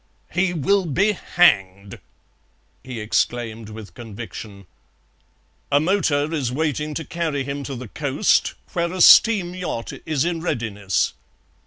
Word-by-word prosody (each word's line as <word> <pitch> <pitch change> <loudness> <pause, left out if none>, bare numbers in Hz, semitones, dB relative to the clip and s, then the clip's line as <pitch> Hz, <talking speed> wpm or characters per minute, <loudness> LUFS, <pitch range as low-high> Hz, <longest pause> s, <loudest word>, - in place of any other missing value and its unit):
"He 175 +2 +1
will 180 +3 +1
be 195 +8 +2
hanged!" 100 - +1 0.8
he 125 -3 -7
exclaimed 115 0 -1
with 110 -1 -10
conviction. 110 -3 -9 1.1
"A 145 - +5
motor 155 -3 +1
is 135 -6 -1
waiting 150 +1 -2
to 160 - -4
carry 160 -5 -2
him 140 +1 -5
to 135 - -5
the 125 0 -7
coast, 145 - +1 0.2
where 170 -1 0
a 185 0 -3
steam 190 -3 +7
yacht 180 -11 -4
is 155 -2 +1
in 170 -2 -2
readiness." 105 - -1
145 Hz, 130 wpm, -22 LUFS, 115-170 Hz, 1.1 s, steam